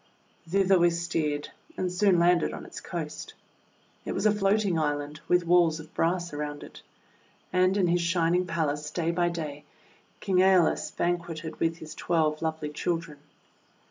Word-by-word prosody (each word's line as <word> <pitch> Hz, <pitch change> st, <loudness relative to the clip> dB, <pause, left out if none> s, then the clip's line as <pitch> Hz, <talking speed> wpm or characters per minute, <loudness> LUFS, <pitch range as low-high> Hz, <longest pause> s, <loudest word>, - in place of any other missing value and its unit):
Thither 195 Hz, 0 st, +3 dB
we 175 Hz, 0 st, +5 dB
steered, 165 Hz, -4 st, -2 dB, 0.3 s
and 185 Hz, -1 st, -1 dB
soon 185 Hz, 0 st, +3 dB
landed 175 Hz, 0 st, +3 dB
on -, -, -7 dB
its -, -, -9 dB
coast. -, -, -6 dB, 0.7 s
It -, -, -4 dB
wras -, -, -2 dB
a 215 Hz, -, +6 dB
floating 200 Hz, -3 st, +1 dB
island, 145 Hz, 0 st, -2 dB
with 180 Hz, -1 st, +3 dB
walls 170 Hz, -2 st, +4 dB
of 160 Hz, +1 st, -12 dB
brass 175 Hz, 0 st, 0 dB
around 145 Hz, 0 st, -5 dB
it. -, -, -12 dB, 0.7 s
And 185 Hz, +1 st, +3 dB
in 190 Hz, -, +3 dB
his 175 Hz, 0 st, +2 dB
shining 170 Hz, +1 st, +1 dB
palace, 150 Hz, -3 st, -2 dB
day 165 Hz, +1 st, -1 dB
by 175 Hz, 0 st, +1 dB
day, 150 Hz, -4 st, -5 dB, 0.6 s
King 190 Hz, -3 st, 0 dB
^Eolus 185 Hz, -2 st, +4 dB
banqueted 170 Hz, -2 st, -2 dB
with 165 Hz, 0 st, 0 dB
his 155 Hz, -1 st, -9 dB
twelve 155 Hz, -3 st, 0 dB
lovely 160 Hz, -2 st, -2 dB
children. 165 Hz, 0 st, -3 dB
170 Hz, 155 wpm, -27 LUFS, 155-180 Hz, 0.7 s, a